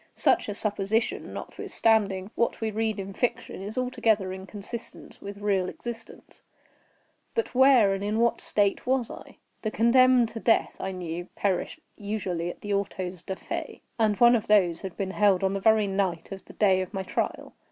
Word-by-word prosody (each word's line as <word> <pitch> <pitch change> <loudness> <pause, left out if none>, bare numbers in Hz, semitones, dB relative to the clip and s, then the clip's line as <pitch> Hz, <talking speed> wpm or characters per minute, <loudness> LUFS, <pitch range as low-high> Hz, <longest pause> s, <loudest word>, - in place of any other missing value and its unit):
Such - - +2
a 205 - -3
supposition, 210 +2 -1
notwithstanding 205 -3 0
what 235 - 0
we 220 -1 -2
read 220 -1 -1
in 195 0 -6
fiction, 240 -4 -2
is 205 +4 -7
altogether 220 -6 +1
inconsistent 200 +4 -8
with 200 0 -7
real 195 -3 0
existence;—but 240 - -9
where 255 -6 +6
and 195 0 -3
in 210 +2 -1
what 235 0 +2
state 205 +3 +1
was 255 -2 +1
I? - - -11 0.2
The 215 - -1
condemned 245 +1 +4
to 225 - -7
death, 225 - +2
I 190 - -3
knew, 175 -2 -5
perished 200 - -1 0.2
usually 195 -5 -3
at - - -9
the 205 0 -3
autos 185 -3 -3
da 190 - -5
fe, - - -6 0.2
and 215 -2 +2
one 240 0 +7
of 230 0 -2
these 180 -6 +3
had 190 -3 -7
been 190 -1 -2
held 200 -2 +3
on 190 0 +1
the 195 - -1
very 220 +1 +4
night 190 -3 -2
of 195 -1 -8
the - - -13
day 190 -3 +3
of 185 +3 -6
my 190 - -2
trial. - - -3
205 Hz, 175 wpm, -27 LUFS, 190-225 Hz, 0.2 s, one